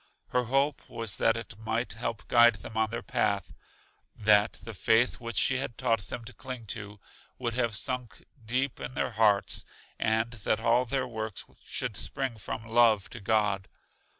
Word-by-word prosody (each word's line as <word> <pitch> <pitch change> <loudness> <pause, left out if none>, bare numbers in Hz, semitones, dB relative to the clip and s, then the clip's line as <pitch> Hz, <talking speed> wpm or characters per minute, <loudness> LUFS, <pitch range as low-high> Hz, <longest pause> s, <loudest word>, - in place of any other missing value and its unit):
Her 125 0 +1
hope 135 +4 +1
was 115 -2 -4
that 115 0 +3
it 110 -2 -7
might 110 +2 -1
help 115 0 -4
guide 120 -1 +7
them 110 +1 -8
on 110 -1 +2
their 115 +1 -4
path; 100 -3 0 0.6
that 105 0 +4
the 115 +2 -9
Faith 115 +4 +3
which 115 -1 -5
she 135 -2 +3
had 125 -3 -4
taught 115 -4 +2
them 115 - -6
to 125 - -9
cling 125 -3 -7
to, 105 -1 -8 0.4
would 120 -2 -2
have 115 -3 0
sunk 125 +2 -3 0.2
deep 125 +4 -1
in 130 - -6
their - - 0
hearts; 105 -3 +2 0.4
and 110 +1 +2
that 110 -1 0
all 115 +2 +3
their 130 +1 -1
works 110 -2 -5 0.2
should 125 -5 -3
spring 130 +2 -3
from 110 +2 -5
love 115 -3 +4
to 120 - -7
God. 105 -2 +1
115 Hz, 175 wpm, -29 LUFS, 110-120 Hz, 0.6 s, guide